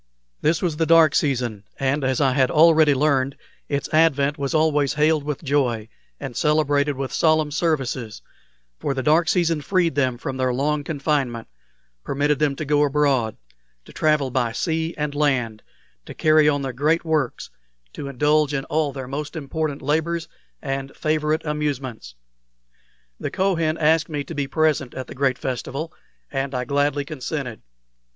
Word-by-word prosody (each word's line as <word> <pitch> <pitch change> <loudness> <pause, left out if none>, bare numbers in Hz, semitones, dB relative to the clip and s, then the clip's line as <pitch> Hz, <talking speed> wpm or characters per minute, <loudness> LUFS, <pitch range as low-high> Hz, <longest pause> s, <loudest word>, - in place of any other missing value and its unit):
This 160 +4 +1
was 165 -4 -1
the 160 0 +1
dark 165 -2 +6
season, 120 -7 0 0.2
and, 135 +2 0
as 130 -1 0
I 135 -2 +3
had 130 -1 +3
already 155 -2 +5
learned, 135 -1 +1 0.3
its 140 0 -1
advent 145 -3 +3
was 140 0 -3
always 150 -3 +2
hailed 150 0 +2
with 150 +1 -4
joy 125 -6 0 0.3
and 130 -3 -6
celebrated 145 -1 +2
with 135 -2 -4
solemn 155 -2 +2
services, 135 -8 -2 0.6
for 140 - -2
the 130 - -2
dark 160 +4 +3
season 165 -4 +1
freed 175 +1 +1
them 130 -3 0
from 130 +2 -5
their 130 -1 +1
long 145 +2 0
confinement, 140 -6 -1 0.6
permitted 145 +1 0
them 150 -2 +1
to 155 - -5
go 145 +1 +2
abroad, 140 -6 +1 0.5
to - - -14
travel 150 -4 +1
by 120 -3 0
sea 160 +4 -2
and 150 -1 -2
land, 130 -7 0 0.5
to - - -9
carry 155 -1 +4
on 145 -1 0
their 130 -1 -3
great 155 +7 +1
works, 155 - -1 0.4
to 140 - -6
indulge 150 +2 +2
in 135 - -2
all 155 -2 0
their 135 -2 -7
most 145 +4 -5
important 150 -1 -3
labors 160 +3 0 0.4
and 135 -1 -4
favorite 155 +1 0
amusements. 135 - -3 1.0
The - - -3
Kohen 165 -5 0
asked 160 0 +2
me 145 -2 -3
to 165 - -8
be 145 -3 -2
present 150 -3 0
at 130 - -5
the - - -10
great 135 -1 0
festival, 135 +5 -4 0.4
and 135 -1 -2
I 125 0 -2
gladly 145 +1 0
consented. 135 -5 -5
145 Hz, 160 wpm, -22 LUFS, 135-155 Hz, 1.0 s, dark